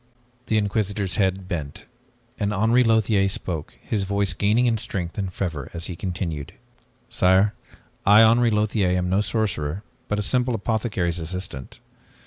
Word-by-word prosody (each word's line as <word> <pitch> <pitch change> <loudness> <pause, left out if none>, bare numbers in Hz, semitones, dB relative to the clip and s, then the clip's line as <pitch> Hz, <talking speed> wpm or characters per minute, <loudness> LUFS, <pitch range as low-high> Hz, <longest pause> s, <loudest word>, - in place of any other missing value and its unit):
The 110 - +2
Inquisitor's 100 -2 0
head 95 -2 0
bent, 85 +3 -5 0.5
and 105 -1 0
Henri 115 +5 +4
Lothiere 110 -4 +3
spoke, 85 -5 -5
his 105 - -1
voice 100 -1 +1
gaining 105 +7 +2
in 115 -2 +2
strength 90 -5 -4
and 95 -2 -2
fervor 80 -7 -4
as 85 0 -4
he 90 - -4
continued. 85 -5 -4 0.5
"Sire, 95 +3 +3 0.5
I, 105 +3 +7
Henri 115 +2 +5
Lothiere, 105 -4 +1
am 90 0 -1
no 95 +2 +3
sorcerer 100 -6 -2 0.2
but 105 - -1
a 105 - -1
simple 125 +2 +1
apothecary's 105 -5 -1
assistant. 80 -6 -6
100 Hz, 145 wpm, -23 LUFS, 90-110 Hz, 0.5 s, I